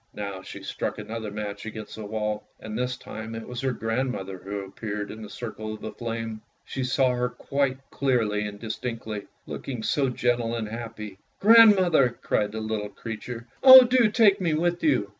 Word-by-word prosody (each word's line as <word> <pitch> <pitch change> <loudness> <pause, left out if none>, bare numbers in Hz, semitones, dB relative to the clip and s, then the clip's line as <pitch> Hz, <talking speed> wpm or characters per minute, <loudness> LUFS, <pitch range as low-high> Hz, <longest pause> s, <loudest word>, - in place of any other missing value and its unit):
Now 100 -2 -5
she - - -10
struck - - -3
another 110 -1 -5
match 105 0 -5
against 110 -1 -7
the 110 - -7
wall, 105 0 -2 0.2
and 110 -1 -7
this 125 +1 -1
time 110 +1 -7
it 115 - -7
was 125 -1 -5
her 135 -1 0
grandmother 115 -5 -3
who 100 +2 -5
appeared 105 +1 -5
in 110 - -9
the 105 - -8
circle 110 0 -6
of 110 - -8
flame. 115 -2 -4 0.2
She 135 - -4
saw 130 +1 +2
her 125 0 0
quite 135 +2 -1
clearly 110 -6 +1
and 100 0 -8
distinctly, 110 -2 -5 0.2
looking 125 -5 -6
so 135 +1 +1
gentle 120 -2 0
and 115 -2 -3
happy. 110 -3 -7
" - - -43
Grandmother! 190 - +6
" - - -37
cried 105 -1 +1
the 110 - -4
little 110 -1 -3
creature. 115 +3 -7
" - - -34
Oh, 260 -1 +12
do 245 -2 +4
take 210 -3 +4
me 165 -4 +1
with 175 +2 0
you! 130 -10 +3
115 Hz, 190 wpm, -26 LUFS, 105-130 Hz, 0.2 s, Oh